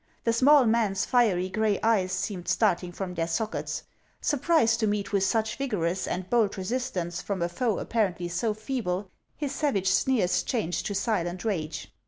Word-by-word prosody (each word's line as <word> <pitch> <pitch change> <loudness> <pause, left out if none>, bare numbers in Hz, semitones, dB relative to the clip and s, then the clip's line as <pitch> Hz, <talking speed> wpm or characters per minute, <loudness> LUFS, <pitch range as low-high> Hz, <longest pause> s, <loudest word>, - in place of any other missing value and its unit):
The 230 - +2
small 275 +3 +6
man's 220 -4 +2
fiery 210 -8 +2
gray 210 +1 0
eyes 205 -5 +2
seemed 185 -4 -3
starting 180 -5 +1
from 180 0 -5
their 165 -2 -1
sockets. 215 +6 -2 0.4
Surprised 275 -6 +2
to 220 - +1
meet 205 0 -2
with 195 -1 +3
such 220 +2 0
vigorous 185 -9 -1
and 180 0 -3
bold 220 -2 +2
resistance 185 -5 -3
from 200 -2 -3
a - - +1
foe 215 +5 -1
appar 220 -5 0
ently 175 -1 -5
so 210 +5 0
feeble, 210 -5 -3 0.3
his 290 -3 -3
savage 230 -12 0
sneers 200 -3 +2
changed 195 -9 -2
to 205 - -3
silent 185 -3 -1
rage. 165 -8 -3
205 Hz, 170 wpm, -27 LUFS, 180-230 Hz, 0.4 s, small